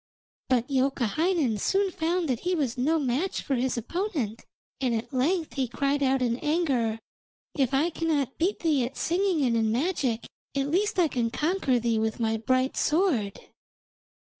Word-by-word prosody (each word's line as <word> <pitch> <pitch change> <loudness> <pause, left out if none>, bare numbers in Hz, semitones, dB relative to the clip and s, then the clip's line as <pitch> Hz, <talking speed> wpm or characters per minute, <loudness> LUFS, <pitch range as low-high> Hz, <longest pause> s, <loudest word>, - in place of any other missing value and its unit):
But 245 -2 +2
Youkahainen 270 - +1
soon 390 - +1
found 340 +1 -1
that 250 -4 0
he 360 0 0
was 275 -7 -1
no 290 +6 +2
match 290 +6 -1
for 280 - -2
his 255 0 0
opponent, 275 - -2 0.4
and 255 -3 +1
at 225 +5 -4
length 315 +6 0
he 265 -3 -1
cried 280 +4 0
out 265 -1 +2
in 235 -1 0
anger: 275 -9 +1 0.6
'If 270 -3 +1
I 295 +6 +2
cannot 300 -5 -1
beat 370 +5 0
thee 305 -6 +2
at 245 +3 -5
singing 350 -4 +1
and 235 -2 +2
in 220 -1 +2
magic, 255 -3 0 0.3
at 275 +1 0
least 410 +5 +1
I 350 -3 +4
can 240 -5 -1
conquer 300 -1 +1
thee 230 -1 +1
with 220 +1 -1
my 225 -1 +1
bright 255 +4 +1
sword.' 300 - +1
275 Hz, 165 wpm, -27 LUFS, 240-330 Hz, 0.6 s, I